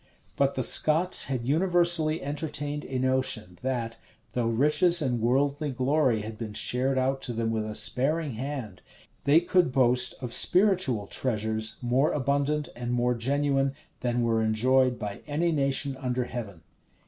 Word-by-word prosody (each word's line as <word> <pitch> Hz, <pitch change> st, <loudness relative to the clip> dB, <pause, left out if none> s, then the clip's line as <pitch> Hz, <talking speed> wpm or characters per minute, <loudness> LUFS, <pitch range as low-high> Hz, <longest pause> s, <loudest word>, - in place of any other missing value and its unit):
[] -, -, -33 dB
But 140 Hz, 0 st, +1 dB
the 130 Hz, -, 0 dB
Scots 160 Hz, +8 st, +4 dB
had 125 Hz, -3 st, -4 dB
universally 170 Hz, -1 st, +2 dB
entertained 145 Hz, 0 st, -4 dB
a 130 Hz, -, -4 dB
notion, 130 Hz, -8 st, -1 dB
that, 120 Hz, -3 st, -3 dB, 0.4 s
though 120 Hz, -2 st, -1 dB
riches 150 Hz, +9 st, +3 dB
and 125 Hz, -6 st, -1 dB
worldly 140 Hz, +5 st, 0 dB
glory 130 Hz, -2 st, +1 dB
had 110 Hz, +1 st, -8 dB
been 110 Hz, -3 st, -6 dB
shared 130 Hz, +4 st, 0 dB
out 135 Hz, +1 st, 0 dB
to 125 Hz, -, -4 dB
them 115 Hz, 0 st, -2 dB
with 110 Hz, -1 st, -2 dB
a 105 Hz, -, -6 dB
sparing 135 Hz, +8 st, -1 dB
hand, 125 Hz, -5 st, -6 dB, 0.4 s
they 145 Hz, +3 st, +5 dB
could 175 Hz, -3 st, +2 dB
boast 125 Hz, -1 st, +2 dB
of 125 Hz, -3 st, -4 dB
spiritual 180 Hz, -, +3 dB
treasures 110 Hz, -1 st, -2 dB
more 130 Hz, +5 st, +1 dB
abundant 145 Hz, +2 st, 0 dB
and 120 Hz, 0 st, -5 dB
more 125 Hz, 0 st, +1 dB
genuine 135 Hz, +2 st, 0 dB, 0.2 s
than 120 Hz, -1 st, -1 dB
were 115 Hz, -1 st, +1 dB
enjoyed 125 Hz, +3 st, +2 dB
by 105 Hz, -2 st, -6 dB
any 165 Hz, +4 st, 0 dB
nation 140 Hz, -2 st, 0 dB
under 125 Hz, -1 st, -2 dB
heaven. 105 Hz, -9 st, -7 dB
130 Hz, 155 wpm, -27 LUFS, 120-145 Hz, 0.4 s, they